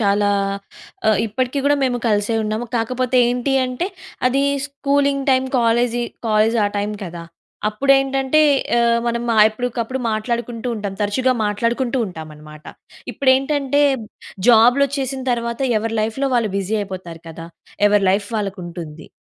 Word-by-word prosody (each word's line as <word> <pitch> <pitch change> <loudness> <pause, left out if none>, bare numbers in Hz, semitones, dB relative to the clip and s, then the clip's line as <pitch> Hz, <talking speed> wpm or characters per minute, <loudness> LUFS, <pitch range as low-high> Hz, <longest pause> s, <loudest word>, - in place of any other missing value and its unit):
చాలా 205 -1 +2 0.8
అ - - +6 0.2
ఇప్పటికి 250 +5 -2
కూడా 290 0 +4
మేము 245 -2 0
కలిసే 210 +1 +1
ఉన్నాము. 215 +2 -2
కాకపోతే 255 +2 -1
ఏంటి 250 +2 -1
అంటే 255 +8 -3 0.4
అది 275 +2 +1 0.2
స్కూలింగ్ 280 0 0
టైం 260 0 +3
కాలేజి, 240 +1 +1 0.3
కాలేజ్ 215 +2 +3
ఆ - - +3
టైం 205 +1 -2
కదా, 170 -1 -7 0.5
అప్పుడు 215 +6 -1
ఆహ్, - - +5
ఏంటంటే 270 +2 +1 0.7
మనం 235 0 -1 0.3
ఎప్పటికప్పుడు 240 +2 -3
మాట్లాడుకుంటూ 235 +2 -3
ఉంటాం 205 -2 -5
తరచుగా 250 +6 +1
మాట్లాడుకుంటూ 235 +5 -1
ఉంటాం 160 -4 -8
అన్నమాట. 150 0 -14 0.5
ఇప్పుడేంటంటే 275 +1 +2 0.7
జాబ్‌లొచ్చేసిన 265 +3 +3
తర్వాత 235 +1 -3 0.2
ఎవరి 225 +1 -3
లైఫ్‌లో 245 +6 -1
వాళ్ళు 230 -3 +1
బిజీ 200 +3 -1
అయిపోతారు 185 -4 -7
కదా. 165 0 -9 0.4
ఎవరి 205 -1 +3
లైఫ్ 200 +1 0
వాళ్ళకి 200 -2 -3
ఉంటుంది. 165 -3 -9
235 Hz, 130 wpm, -20 LUFS, 205-260 Hz, 0.8 s, అ